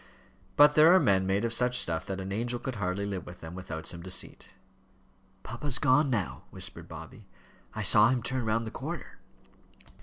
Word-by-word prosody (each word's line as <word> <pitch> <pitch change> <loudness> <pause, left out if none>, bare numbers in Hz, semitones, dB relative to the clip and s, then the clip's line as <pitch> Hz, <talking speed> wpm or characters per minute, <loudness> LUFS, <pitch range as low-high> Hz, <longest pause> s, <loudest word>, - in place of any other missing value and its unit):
But 150 0 +7
there 155 +3 +7
are - - +6
men 95 - +2
made 100 +4 0
of 115 - -2
such 125 +1 +1
stuff 80 -1 -1
that 95 0 -4
an 95 +1 -6
angel 120 +4 -2
could 130 -1 -6
hardly 100 0 -2
live 95 -4 -5
with 90 +1 -11
them 80 +1 -8
without 85 -3 -7
some 85 -1 -6
deceit. 95 +1 -3 0.9
"Papa's 130 +1 -2
gone 145 +1 +3
now," 105 -8 -3
whispered - - -3
Bobby; - - -11 0.5
"I - - -3
saw 105 +1 +6
him 130 -2 0
turn 130 0 -2
round 115 +1 0
the 110 - -6
corner." - - -7
110 Hz, 185 wpm, -29 LUFS, 95-125 Hz, 0.9 s, But